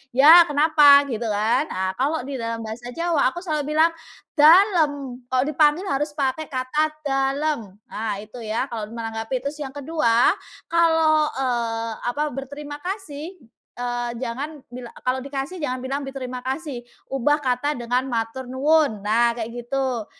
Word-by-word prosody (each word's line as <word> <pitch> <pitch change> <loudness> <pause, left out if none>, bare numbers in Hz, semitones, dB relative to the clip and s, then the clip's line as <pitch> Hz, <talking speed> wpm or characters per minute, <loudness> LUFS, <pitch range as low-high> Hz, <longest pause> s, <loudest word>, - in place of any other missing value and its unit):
ya 315 +6 +9
kenapa?" 290 -1 +6
Gitu 235 -3 -3
kan. 215 +3 +1
Nah, 190 0 -2
kalau 290 +5 0
di 280 - -4
dalam 230 -2 -3
bahasa 225 +2 -7
Jawa 330 -2 +1
aku 345 - -6
selalu 305 -4 -3
bilang, 320 +2 +4 0.4
"dalem." 300 - +4
Kalau 255 0 +3
dipanggil 305 +5 +2
harus 295 +1 -1
pakai 290 +1 -2
kata, 260 +3 0 0.2
"dalem." 270 -4 -1 0.2
Nah 210 -2 -4
itu 220 +3 -10
ya 220 +4 -2
kalau 220 -4 -6
menanggapi. 225 +2 -4
Terus 280 +4 -5
yang 270 - -7
ke-2, 275 -5 +2 0.3
kalau, 320 -2 +3
eee, 230 -3 -1 0.2
apa, 285 +5 -1
berterima 285 +2 -7
kasih, 360 -4 -5 0.5
eee, 245 0 -2
jangan 275 +5 -5
bil 250 0 -8 0.2
kalau 255 +1 0
dikasih 280 +5 -4
jangan 255 -6 -3
bilang 275 +2 -3
berterima 255 -2 -6
kasih, 265 -2 -4 0.2
ubah 290 +3 +1
kata 260 +2 0
dengan 245 0 -1
"matur 235 +1 -3
nuwun." 270 -2 +2
Nah 230 +3 +2
kayak 230 -1 -5 0.2
gitu. 260 -3 -2
270 Hz, 150 wpm, -23 LUFS, 240-300 Hz, 0.5 s, ya